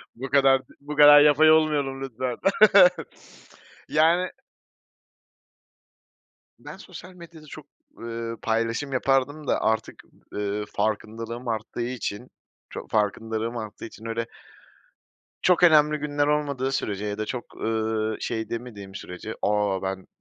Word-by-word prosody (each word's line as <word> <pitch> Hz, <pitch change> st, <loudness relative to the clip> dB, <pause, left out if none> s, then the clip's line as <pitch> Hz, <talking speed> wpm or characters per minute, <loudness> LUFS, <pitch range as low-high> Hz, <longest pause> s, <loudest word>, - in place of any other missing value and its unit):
Bu 130 Hz, +3 st, -7 dB
kadar 135 Hz, -1 st, +4 dB
d -, -, -21 dB
bu 150 Hz, +1 st, -7 dB
kadar 145 Hz, 0 st, +9 dB
yapay 150 Hz, +1 st, +6 dB
olmayalım, 145 Hz, -4 st, +1 dB
lütfen. 125 Hz, -1 st, -4 dB, 1.5 s
Yani 170 Hz, +4 st, +2 dB, 2.3 s
Ben -, -, -10 dB
sosyal 185 Hz, +1 st, -12 dB
medyada 170 Hz, -3 st, -14 dB
çok, 150 Hz, 0 st, -11 dB, 0.3 s
ııı, 115 Hz, 0 st, -5 dB
paylaşım 115 Hz, +5 st, -1 dB
yapardım 135 Hz, +3 st, 0 dB
da, -, -, +1 dB
artık, 110 Hz, 0 st, -2 dB, 0.3 s
ııı, 105 Hz, 0 st, -3 dB
farkındalığım 115 Hz, +3 st, -3 dB
arttığı 110 Hz, +1 st, -4 dB
için 120 Hz, -1 st, -5 dB, 0.4 s
ço -, -, -8 dB
farkındalığım 110 Hz, +2 st, -2 dB
arttığı 110 Hz, -2 st, -7 dB
için, 110 Hz, 0 st, -12 dB
öyle 115 Hz, 0 st, -3 dB, 1.2 s
çok 180 Hz, -1 st, +3 dB
önemli 150 Hz, -3 st, +5 dB
günler 145 Hz, 0 st, -1 dB
olmadığı 140 Hz, -3 st, -1 dB
sürece 105 Hz, -5 st, -3 dB
ya 105 Hz, 0 st, -4 dB
da 110 Hz, -, -3 dB
çok, 125 Hz, -2 st, -7 dB
ııı, 110 Hz, -1 st, -2 dB
şey 110 Hz, -2 st, -3 dB
demediğim 110 Hz, -5 st, -7 dB
sürece, 100 Hz, +3 st, -8 dB
"A, 105 Hz, -2 st, 0 dB
ben 95 Hz, 0 st, -4 dB
120 Hz, 120 wpm, -25 LUFS, 110-145 Hz, 2.3 s, kadar